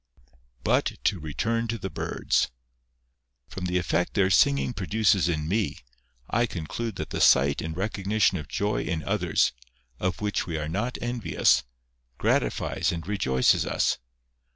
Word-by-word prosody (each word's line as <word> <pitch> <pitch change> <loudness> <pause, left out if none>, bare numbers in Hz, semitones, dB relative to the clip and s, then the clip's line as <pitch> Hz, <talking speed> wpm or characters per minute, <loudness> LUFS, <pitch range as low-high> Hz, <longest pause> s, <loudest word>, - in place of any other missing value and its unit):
But - - +2
to 95 - +1
return 115 +10 -1
to 115 +1 -2
the - - -5
birds. - - 0 1.0
From 90 - -6
the 90 0 0
effect 90 0 0
their 95 -2 +3
singing 140 +5 +3
produces 100 -3 +2
in 75 -2 -1
me, 105 +3 0 0.5
I 120 +1 +1
conclude 105 +5 -4
that - - -5
the - - -2
sight 70 +2 +5
and 80 +1 -5
recognition 100 -1 +1
of 75 - -8
joy 105 +1 -1
in 80 -3 -2
others, 95 -4 +1 0.5
of 90 -2 -1
which 105 -2 -1
we 85 -2 -2
are 75 0 -3
not 105 +10 -2
envious, 120 -7 +2 0.6
gratifies - - 0
and 85 -2 -5
rejoices 65 -11 +2
us. - - 0
95 Hz, 145 wpm, -26 LUFS, 80-110 Hz, 1.0 s, sight